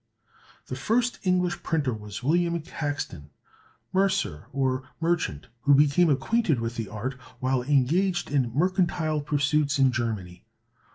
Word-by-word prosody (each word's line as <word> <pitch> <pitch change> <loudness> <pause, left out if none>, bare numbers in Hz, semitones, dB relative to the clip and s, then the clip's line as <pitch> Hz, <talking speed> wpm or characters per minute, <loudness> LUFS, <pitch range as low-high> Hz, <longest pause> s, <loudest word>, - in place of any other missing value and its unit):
The 130 - -5
first 235 - 0
English 180 -2 +1
printer 145 -6 0
was 105 +1 -7
William 170 +4 +2
Caxton, 145 - -5 0.6
mercer, 190 - 0
or 130 -1 0 0.2
merchant, 165 - -1 0.2
who 140 +3 +5
became 150 +4 +4
acquainted 150 - +1
with 115 +1 -3
the 115 -3 -4
art 110 +5 -4 0.3
while 130 0 +1
engaged 150 +7 +1
in 130 -5 +1
mercantile 170 - +1
pursuits 145 0 +1
in 135 -1 +4
Germany. 105 -7 -3
145 Hz, 125 wpm, -26 LUFS, 125-175 Hz, 0.6 s, who